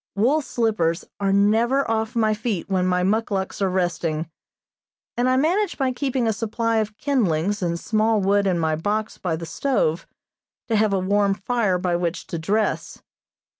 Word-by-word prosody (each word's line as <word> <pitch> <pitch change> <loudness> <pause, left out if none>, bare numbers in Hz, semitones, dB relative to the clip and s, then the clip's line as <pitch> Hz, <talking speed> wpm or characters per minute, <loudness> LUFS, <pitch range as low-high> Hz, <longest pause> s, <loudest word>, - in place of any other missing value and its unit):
Wool 255 +10 +2
slippers 210 - 0
are 200 -1 +1
never 225 +7 +3
off 225 +1 -1
my 220 -2 +2
feet 215 -4 -3
when 185 -2 +1
my 180 0 +1
muckluks 200 -1 -1
are 195 - +2
resting, 170 -3 -1 0.8
and 245 +1 +1
I 255 - +3
manage 350 +7 +1
by 265 -2 +1
keeping 260 -1 -1
a 220 - +2
supply 225 +1 -1
of 215 -1 -2
kindlings 205 - 0
and 170 -1 -1
small 220 +2 +1
wood 200 +1 +2
in 180 -2 +1
my 160 -2 +1
box 210 +6 -2
by 175 -4 -1
the 165 +1 -6
stove, 170 - -1 0.6
to 225 - +2
have 215 -1 +3
a 195 - +2
warm 200 +1 +2
fire 210 -2 0
by 180 -1 0
which 175 0 -2
to 170 - -1
dress. 210 +7 -1
205 Hz, 170 wpm, -23 LUFS, 180-230 Hz, 0.8 s, never